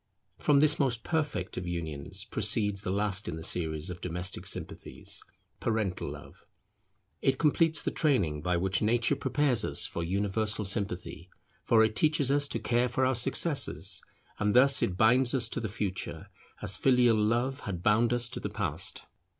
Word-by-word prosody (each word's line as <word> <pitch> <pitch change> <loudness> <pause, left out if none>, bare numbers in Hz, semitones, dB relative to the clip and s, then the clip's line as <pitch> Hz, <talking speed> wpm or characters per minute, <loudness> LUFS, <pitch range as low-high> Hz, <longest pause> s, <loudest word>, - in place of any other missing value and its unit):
From 140 -1 +3
this 150 0 +4
most 120 -5 0
perfect 150 - -3
of 90 - -5
unions 85 +2 -5
proceeds 105 -2 +4
the 90 - -5
last 100 0 0
in 85 - -5
the 80 - -8
series 80 -1 0
of 90 - -9
domestic 90 +1 -3
sympathies, - - -3 0.4
parental 110 -5 -2
love. - - -12 0.7
It 135 -1 +1
completes 160 +1 +2
the - - -2
training 100 - 0
by 90 +2 0
which 95 +2 0
Nature 120 +2 +1
prepares 135 -7 +1
us - - +3
for - - -2
universal 105 +4 -1
sympathy: 95 -3 -2 0.3
for 110 -1 +4
it 110 0 0
teaches 150 -3 +2
us 145 0 +2
to - - -3
care 120 +1 0
for 130 - 0
our 130 - +2
successors; 135 +5 0 0.4
and 105 +2 0
thus 135 +2 +5
it 90 - -1
binds 125 +4 +3
us 120 -4 +3
to - - -3
the 110 -3 -4
Future, 100 -2 -5 0.3
as 95 - 0
filial 125 -3 +3
love 120 +6 0
had 90 -8 -6
bound 110 +4 +3
us 120 -1 +2
to 125 - -6
the 105 - -5
Past. 90 -6 -4
110 Hz, 170 wpm, -29 LUFS, 95-130 Hz, 0.7 s, thus